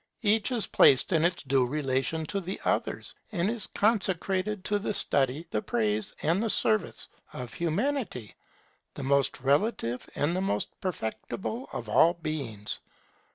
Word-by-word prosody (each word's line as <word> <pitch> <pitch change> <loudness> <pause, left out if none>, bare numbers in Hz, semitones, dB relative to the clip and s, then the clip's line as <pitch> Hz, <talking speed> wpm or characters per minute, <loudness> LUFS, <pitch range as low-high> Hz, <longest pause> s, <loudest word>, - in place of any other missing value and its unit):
Each 215 +2 +3
is 235 -4 +2
placed 135 +6 +5
in 160 -1 +3
its 175 +1 +1
due 135 -2 +2
relation 140 +3 -1
to 200 +5 -2
the 185 +2 -5
others, - - -1 0.2
and 195 0 0
is 230 -3 -3
consecrated 195 -1 0
to 205 +1 +1
the 205 0 -2
study, 135 +4 +1
the 105 - 0
praise, 110 -2 0
and 170 +6 +2
the 225 - 0
service 215 -2 +2 0.3
of 125 -2 -6
Humanity, 170 - -2 0.6
the 140 - -5
most 140 0 +2
relative 140 - 0
and 155 +4 +1
the 185 - 0
most 195 - 0
perfectible 185 - -4
of - - -5
all 170 +2 +5
beings. 140 -11 -3
165 Hz, 150 wpm, -28 LUFS, 135-205 Hz, 0.6 s, placed